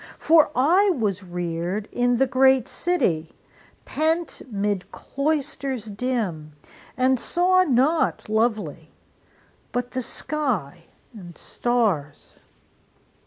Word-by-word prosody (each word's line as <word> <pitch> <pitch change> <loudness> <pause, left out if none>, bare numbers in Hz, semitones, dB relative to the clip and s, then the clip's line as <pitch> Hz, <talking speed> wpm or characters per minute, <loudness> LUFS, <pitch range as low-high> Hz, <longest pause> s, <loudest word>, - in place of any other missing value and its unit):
For 320 -1 +4
I 345 +11 +4
was 205 -4 -1
reared 175 +2 -4
In 245 0 +1
the 270 - +3
great 265 -1 +3
city, 170 - -1 0.5
pent 320 +2 -1
'mid 205 -3 -2
cloisters 280 -4 -3
dim, 200 -9 -3 0.4
And 260 0 +2
saw 370 +5 +2
nought 290 +3 +1
lovely 215 - -1 0.8
but 245 0 -3
the 255 - -2
sky 220 - -3 0.3
and 175 -6 -11
stars. 205 -13 -2
245 Hz, 95 wpm, -23 LUFS, 185-275 Hz, 0.8 s, For